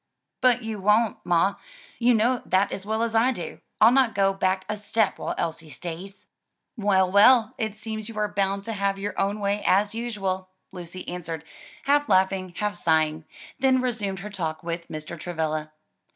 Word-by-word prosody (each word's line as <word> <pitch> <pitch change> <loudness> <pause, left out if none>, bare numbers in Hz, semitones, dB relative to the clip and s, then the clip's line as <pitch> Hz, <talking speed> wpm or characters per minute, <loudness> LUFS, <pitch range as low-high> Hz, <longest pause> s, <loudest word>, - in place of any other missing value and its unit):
"But 250 -2 +4
you 220 -2 -4
won't, 210 +3 +3
ma, 175 +3 +2 0.4
you 245 0 +4
know 240 +3 +2
that 190 +2 +2
as 195 +1 -6
well 220 +1 0
as 230 -1 -1
I 230 +3 +4
do. 175 -10 -6 0.2
I'll 220 +2 +7
not 255 -4 +3
go 195 0 +3
back 190 0 0
a 215 - -2
step 210 0 0
while - - -3
Elsie 160 -1 -3
stays." 180 +5 -8 0.5
"Well, 195 -4 +2
well, 220 +3 +6
it 220 -2 -2
seems 215 0 -6
you 225 - -9
are 210 0 +1
bound 200 -1 -1
to 225 - -4
have 200 -1 0
your 200 0 -3
own 200 +2 0
way, 200 0 0
as 205 +2 +3
usual," 195 -5 -3 0.2
Lucy 180 0 -9
answered, 165 -3 -5 0.4
half 290 -1 +2
laughing, 190 -2 +2
half 210 0 -1
sighing, 160 -1 +1 0.3
then 260 -1 +4
resumed 215 -7 -2
her 210 +2 -7
talk 160 -5 -4
with 170 0 -4
Mr. 155 +1 -7
Travilla. 155 -2 -3
200 Hz, 180 wpm, -25 LUFS, 180-220 Hz, 0.5 s, I'll